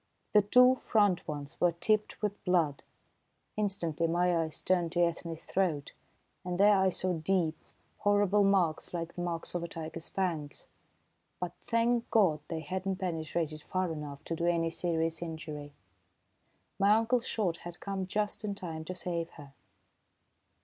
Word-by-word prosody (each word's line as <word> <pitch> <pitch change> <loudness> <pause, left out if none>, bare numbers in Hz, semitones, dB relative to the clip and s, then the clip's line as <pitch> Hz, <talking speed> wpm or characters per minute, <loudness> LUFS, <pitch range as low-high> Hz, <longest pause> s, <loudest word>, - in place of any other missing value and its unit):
The 210 - +7
two 250 +5 +6
front 205 -6 +2
ones 145 -2 -6
were 175 -1 +4
tipped 210 +5 0
with 205 -1 -2
blood. 165 -6 +2 0.7
Instantly 175 -6 0
my 175 +1 +2
eyes 160 -2 -1
turned 175 -2 +1
to 175 - +2
Ethne's 165 -1 -2
throat, 165 -7 -1 0.5
and 180 -1 -3
there 205 +1 +7
I 190 -1 +4
saw 185 0 -1
deep, 165 -1 +1 0.4
horrible 205 0 +3
marks, 185 -4 +2
like 170 -1 -4
the 175 - -5
marks 170 -2 -3
of 175 - -1
a - - -3
tiger's 165 0 -6
fangs; 165 -7 -3 0.7
but, 180 -1 -3
thank 230 +1 +1
God, 185 -9 +4
they 160 -1 -3
had 185 +3 -4
not 190 -1 0
penetrated 160 -3 -2
far 185 +1 -1
enough 145 -2 -7
to 165 - -3
do 170 +1 -1
any 165 -1 +2
serious 165 -1 -1
injury! 160 -3 -6 1.1
My 200 +1 +6
uncle's 230 +2 +1
shot 185 -7 0
had 175 0 -9
come 195 -2 -3
just 210 +2 -1
in 205 -1 -2
time 165 -5 -6
to 185 - -5
save 170 -2 -2
her. 140 -3 -12
175 Hz, 155 wpm, -31 LUFS, 165-195 Hz, 1.1 s, The